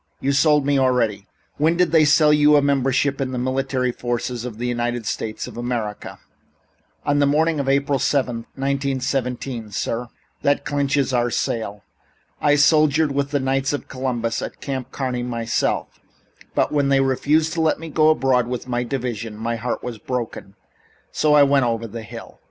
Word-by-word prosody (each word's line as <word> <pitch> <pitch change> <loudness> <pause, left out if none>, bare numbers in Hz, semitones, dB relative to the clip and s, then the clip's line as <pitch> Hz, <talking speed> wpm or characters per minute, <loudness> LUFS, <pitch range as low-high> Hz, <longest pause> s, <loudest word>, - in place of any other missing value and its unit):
You've 140 +1 0
sold 150 -1 +4
me 140 -1 +2
already. 115 -6 +1 0.3
When 160 +3 +2
did 180 -3 +2
they 160 -2 +5
sell 150 0 +5
you 150 0 +5
a 145 - +5
membership 140 0 +1
in 130 -1 -2
the - - -2
military 130 0 -1
forces 120 0 -3
of 115 -4 -6
the 120 - -4
United 120 -1 -2
States 110 +1 -3
of - - -10
America?" 120 -4 -4 0.9
"On 145 0 +2
the 145 - +4
morning 155 +2 +2
of 135 -1 -1
April 140 0 +1
7th, 125 -4 0
1917, 135 -3 -2
sir." 115 +4 -3 0.3
"That 140 0 +1
clinches 140 -2 0
our 120 -1 +2
sale. 105 -4 -3 0.6
I 145 -1 +4
soldiered 150 0 +4
with 140 0 -1
the 145 - 0
Knights 135 +1 0
of 145 - -4
Columbus 120 -3 -2
at - - -7
Camp 130 -2 -5
Kearny 130 -3 -2
myself, 115 -2 -2 0.6
but - - +1
when 145 -2 +1
they 135 -1 +4
refused 150 +4 +1
to 165 - -1
let 160 -1 +2
me 165 - -7
go 155 +1 +4
abroad 130 -5 +2
with 125 0 -4
my 120 -1 -1
division 120 -4 -4
my 115 +2 -2
heart 120 +2 -3
was 120 -3 -6
broken, 115 -6 -5 0.6
so 150 -1 +3
I 145 - +7
went 140 -2 +3
over 115 -1 -2
the 115 +1 -7
hill." 110 - -10
130 Hz, 175 wpm, -21 LUFS, 120-145 Hz, 0.9 s, I